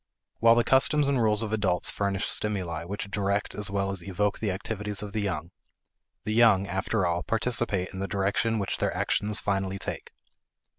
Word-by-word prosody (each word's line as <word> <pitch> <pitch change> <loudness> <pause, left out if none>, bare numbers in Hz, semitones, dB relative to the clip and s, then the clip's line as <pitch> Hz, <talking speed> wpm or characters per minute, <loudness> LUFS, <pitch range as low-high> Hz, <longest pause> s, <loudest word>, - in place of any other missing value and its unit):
While 115 0 +6
the 120 - +3
customs 140 +3 +4
and 135 -3 +1
rules 105 0 +2
of 110 -1 -4
adults 95 -5 +1
furnish 100 -1 -1
stimuli 90 -6 -2
which 100 +2 -5
direct 100 +1 -1
as 105 -2 -3
well 100 0 -1
as 95 -2 -4
evoke 100 +2 -1
the 110 - -1
activities 105 +1 -2
of 100 -1 -7
the 110 - -1
young, 85 -4 -3 0.7
the 110 - -2
young, 110 -4 +5
after 95 +1 -1
all, 85 0 0
participate 115 -5 +2
in 95 - -6
the 95 - -2
direction 100 +3 0
which 100 -2 -2
their - - -1
actions 105 0 0
finally 95 -1 -1
take. - - -6
100 Hz, 185 wpm, -27 LUFS, 95-110 Hz, 0.7 s, While